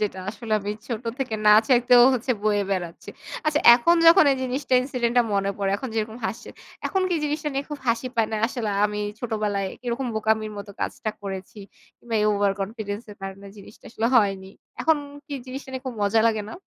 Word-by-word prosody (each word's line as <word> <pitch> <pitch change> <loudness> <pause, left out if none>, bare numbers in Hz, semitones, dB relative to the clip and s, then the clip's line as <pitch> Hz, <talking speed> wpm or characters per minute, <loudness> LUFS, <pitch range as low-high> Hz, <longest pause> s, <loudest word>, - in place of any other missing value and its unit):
যেটা 205 -3 -2
আসলে 220 +1 -7
আমি 200 +1 -4 0.2
ছোট 235 -2 -3 0.2
থেকে 255 -5 -2
না 210 - +9 0.2
চাইতেও 245 -1 +6
হচ্ছে 250 +1 0
বয়ে 205 -1 +2
বেড়াচ্ছি। 175 -3 -4 0.4
আচ্ছা 300 -1 +2
এখন 295 +8 +3
যখন 330 -1 +8
এই 270 - -1
জিনিসটা 260 +2 -3
incident 250 -2 -2
টা - - +6
মনে 200 0 +1
পড়ে, 195 -1 0
এখন 260 - -6
যেরকম 220 0 -2
হাসছেন, 190 +4 -7 0.3
এখন 385 - 0
কি - - +2
জিনিসটা 300 0 -2
নিয়ে 275 +1 -1
খুব 295 - -5
হাসি 230 +2 +1
পায় 225 -1 +3
না? 220 - 0
আসলে 230 -3 -3 0.2
আমি 210 0 -5 0.2
ছোটবেলায় 210 -4 -2
কিরকম 245 +1 -3
বোকামির 220 0 0
মতো 200 0 -8
কাজটা 215 - -3
করেছি? 195 +1 -7 0.4
কিংবা 235 -1 -6
এই 210 - +2
over 205 -1 +2
confidence 205 +1 -5
এর 205 - -11
কারণে 195 +1 -7
জিনিসটা 205 +1 -15
আসলে 225 0 -1
হয়নি। 195 -3 +1 0.3
এখন 320 -1 +3 0.3
কি 290 - -6
জিনিসটা 265 +1 -8
নিয়ে 260 -1 -5
খুব 255 - -4
মজা 205 +2 +3
লাগে 220 -2 +1
না? - - -8
220 Hz, 200 wpm, -24 LUFS, 205-255 Hz, 0.4 s, না